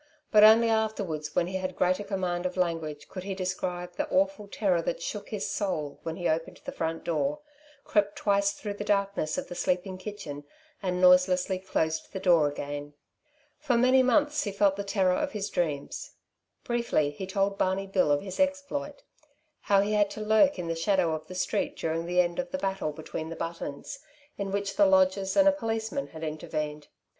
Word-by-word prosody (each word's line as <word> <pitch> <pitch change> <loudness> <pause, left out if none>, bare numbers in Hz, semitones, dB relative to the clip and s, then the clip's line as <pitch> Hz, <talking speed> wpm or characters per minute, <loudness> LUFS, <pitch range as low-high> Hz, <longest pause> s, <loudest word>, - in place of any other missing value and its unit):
But 210 -1 +7
only 225 +2 +8
afterwards, 210 -9 -1
when 170 - +3
he 190 +2 -3
had 185 -1 -4
greater 185 +3 +1
command 185 -3 -1
of 180 - -8
language, 165 -4 -2
could 185 - -7
he 195 +1 -4
describe 180 -1 -3
the - - -1
awful 285 -7 +1
terror 190 -4 +1
that 165 - -2
shook 205 +4 -5
his 210 -2 -3
soul 155 -8 -2
when 165 -1 -4
he 175 -1 -2
opened 165 +1 -2
the - - -4
front 165 0 -3
door, 275 - -1 0.4
crept 205 -1 +1
twice 200 -1 +2
through 205 0 -5
the 205 - -5
darkness 200 -6 0
of - - -3
the - - -7
sleeping 185 +1 -1
kitchen 185 -8 -7 0.4
and 180 -2 -1
noiselessly 180 +1 +4
closed 160 -4 -2
the 190 - -3
door 170 -5 +4
again. 145 0 -5 0.6
For 245 - +1
many 255 +2 +5
months 295 +3 +2
he 205 - -3
felt 200 0 +3
the 200 - -3
terror 195 -2 +2
of 285 +9 -1
his 205 -1 -3
dreams. 150 -5 -3 0.5
Briefly 235 -12 0
he 185 +6 -7
told 195 +1 0
Barney 190 +1 +1
Bill 190 -6 +2
of 145 +3 +2
his 190 -2 -7
exploit. 285 +1 -1 0.7
How 200 -1 +6
he 205 +1 0
had 205 -1 +3
to - - -4
lurk 220 +6 +4
in 175 -2 -4
the 165 - 0
shadow 165 0 +1
of 155 0 -5
the 185 - -8
street 185 - -1
during 165 +1 -2
the 180 +1 +4
end 175 -1 -2
of 270 0 -3
a 280 - -1
battle 195 - -2
between 160 +1 -6
the 165 - -6
Buttons, 165 - -5 0.4
in 200 -1 -3
which 200 0 -2
the 200 - +6
lodgers 190 +2 +3
and 295 0 +6
a - - +8
policeman 225 0 -3
had 160 0 -10
intervened. 150 -1 -4
190 Hz, 195 wpm, -28 LUFS, 170-210 Hz, 0.7 s, only